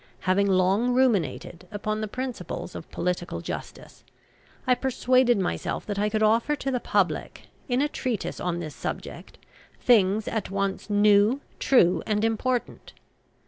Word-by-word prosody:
Having 195 +2 +2
long 195 +6 +2
ruminated 195 -8 0
upon 215 0 -3
the 215 - -2
principles 235 -7 -5
of - - -9
Political 180 0 -3
Justice, - - -8 0.6
I 255 - +4
persuaded 255 -1 +2
myself 190 -2 -2
that 205 -1 -3
I 210 +1 +1
could 215 0 0
offer 230 +7 +3
to 270 -1 -3
the 250 - 0
public, - - -1 0.2
in 250 +3 +2
a - - +2
treatise 250 -7 -3
on 175 -1 -2
this 155 -4 -6
subject, - - -7 0.4
things 215 -3 +3
at 220 - -2
once 195 +1 -2
new, 205 +4 +4 0.2
true, 180 -10 +4
and 215 0 +1
important. 240 +2 -2
215 Hz, 140 wpm, -26 LUFS, 190-245 Hz, 0.6 s, I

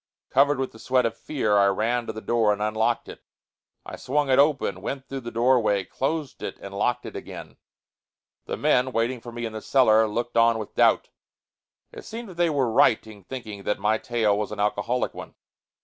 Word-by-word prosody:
Covered 140 +2 +4
with 135 0 -2
the 110 - -15
sweat 130 +1 +1
of 115 - -1
fear, 110 -9 0
I 100 - +5
ran 115 +5 0
to - - -2
the 110 0 -8
door 115 -2 +2
and 105 - -1
unlocked 110 +2 0
it. - - -10 0.6
I - - -8
swung 145 +1 0
it 130 - +4
open, 140 - +2
went 135 +5 -5
through 135 - -5
the 120 -2 -7
doorway, 115 -4 +2
closed 145 +4 -3
it - - -5
and 100 - -9
locked 105 +5 -1
it - - -8
again. - - -9 0.9
The - - -4
men, 125 +1 +2
waiting 115 +2 -1
for 120 - -9
me 120 0 -5
in 110 - -5
the 110 - -6
cellar, 110 -4 +4
looked 120 +3 -3
on 115 0 +5
with 110 -2 -7
doubt. - - +3 0.8
It - - -10
seemed 230 -1 -8
that 180 - -12
they 175 -1 +3
were 135 -6 0
right 110 0 +4
in 105 -4 -13
thinking 110 -5 -7
that 105 - -1
my 105 +2 +1
tale 110 -4 +1
was 105 0 -3
an 105 - -6
alcoholic 105 +4 0
one. - - -10
115 Hz, 210 wpm, -25 LUFS, 105-130 Hz, 0.9 s, I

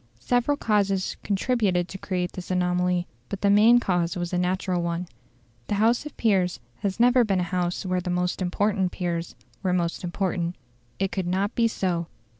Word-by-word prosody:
Several 245 - +1
causes 200 -5 +1
contributed 200 -4 +1
to 190 - -7
create 180 -2 -2
this 185 - -8
anomaly, 180 -1 +1 0.2
but 200 - -5
the 200 - +4
main 220 +4 +7
cause 175 -5 0
was 175 0 -3
a - - +2
natural 180 0 0
one. 170 +1 -2 0.6
The 205 - 0
House 230 +7 +2
of 300 - -13
Peers 185 - +2 0.2
has 195 - -3
never 245 +1 +5
been 195 -4 +1
a 175 +1 -4
House 180 +1 -1
where 185 -1 0
the 180 - -4
most 180 +1 -1
important 190 +1 +1
peers 170 -2 -3 0.3
were 185 -2 0
most 170 -1 -1
important. 175 -1 -1 0.4
It 195 0 -1
could 180 -1 -2
not 195 +4 0
be 230 -1 +3
so. 175 -6 -1
185 Hz, 180 wpm, -25 LUFS, 180-205 Hz, 0.6 s, main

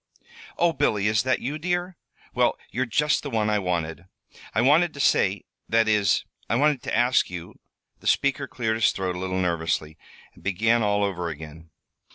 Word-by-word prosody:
"Oh, 170 -1 +3
Billy, 105 -8 +1
is 105 0 +3
that 130 0 0
you, 145 +5 -3
dear? 175 +2 -2 0.4
Well, - - +2
you're 130 +2 -1
just 150 +5 +1
the 145 - -5
one 110 -3 0
I 105 - +2
wanted. 85 -2 -3 0.5
I - - +3
wanted 155 +6 +4
to - - -9
say - - +2 0.3
that 115 0 +3
is, 105 -3 +2 0.2
I 115 - +2
wanted 145 0 +2
to - - -2
ask 120 +1 +3
you 85 -1 -8 0.2
" - - -50
The - - -8
speaker 140 0 +1
cleared 115 -4 -2
his 115 - +3
throat 95 -2 -3
a - - -5
little 95 0 -2
nervously, 80 -3 -1 0.3
and - - -19
began 115 +5 +2
all 105 -1 +1
over 90 -4 -2
again. 80 +1 -10
110 Hz, 190 wpm, -25 LUFS, 90-130 Hz, 0.5 s, wanted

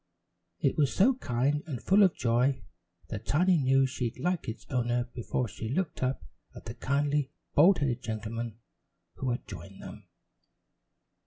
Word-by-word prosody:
It - - 0
was 145 -3 +3
so 240 +8 +5
kind, 140 - 0
and 135 -7 -4
full 195 - +4
of 190 -4 +5
joy 125 +1 +1 0.5
that 110 0 -6
Tiny 175 +3 +3
knew 135 0 +4
she'd 125 -2 -3
like 180 -7 -1
its 110 - -7
owner 120 -1 +1
before 120 +1 -2
she 110 +2 -6
looked 170 +6 -2
up 130 +1 -1 0.3
at - - -11
the - - -5
kindly, 145 0 0 0.2
bald 180 +6 +6
headed 135 -5 -1
gentleman 110 +1 -4 0.6
who 130 - -2
had 120 -4 -3
joined 100 -1 -9
them. - - -10
130 Hz, 155 wpm, -29 LUFS, 120-150 Hz, 0.6 s, bald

